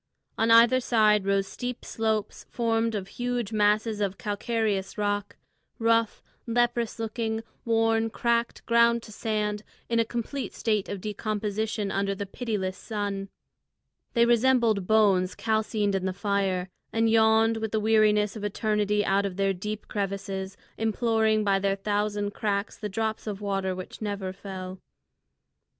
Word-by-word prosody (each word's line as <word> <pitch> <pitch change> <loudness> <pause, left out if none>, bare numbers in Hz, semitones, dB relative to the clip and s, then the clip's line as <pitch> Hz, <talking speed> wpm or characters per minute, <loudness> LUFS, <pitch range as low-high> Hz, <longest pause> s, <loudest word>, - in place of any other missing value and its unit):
On 225 +1 +1
either 230 +3 +7
side 215 -5 +3
rose 195 0 +2
steep 245 +5 -6
slopes 220 -2 -2
formed 230 -1 0
of 195 -2 -3
huge 245 -1 -3
masses 210 +1 +2
of 195 -1 -1
calcareous 210 -2 -2
rock, 205 -1 -1 0.4
rough, 230 -1 +1 0.2
leprous 235 0 +1
looking, 225 0 -2 0.2
worn, 225 -1 +2
cracked, 235 +1 -1
ground 235 0 +4
to 215 - -11
sand, 210 -1 -2 0.3
in 230 0 +2
a - - +5
complete 240 +4 -4
state 215 -3 0
of 200 -2 -4
decomposition 215 0 -2
under 195 0 0
the 200 - -4
pitiless 195 -3 -3
sun. 200 -3 -3 0.9
They 235 0 +5
resembled 235 -4 +3
bones 200 -4 +3
calcined 215 -2 0
in 190 -1 -1
the 190 - -1
fire, 195 -2 -1 0.2
and 225 0 +2
yawned 225 0 +4
with 220 -1 -3
the 220 - +1
weariness 210 -1 +3
of 215 - -7
eternity 210 0 0
out 200 +1 +2
of 185 -1 -7
their 195 0 +2
deep 210 +3 -5
crevices, 195 -1 -3 0.2
imploring 220 -1 +2
by 195 -1 +2
their 195 0 +1
thousand 205 0 -1
cracks 205 -1 -1
the 210 - -5
drop 220 +2 -2
of 205 -2 -3
water 195 -2 -1
which 185 +3 -8
never 200 -3 -3
fell. 190 -1 -7
210 Hz, 145 wpm, -27 LUFS, 200-225 Hz, 0.9 s, either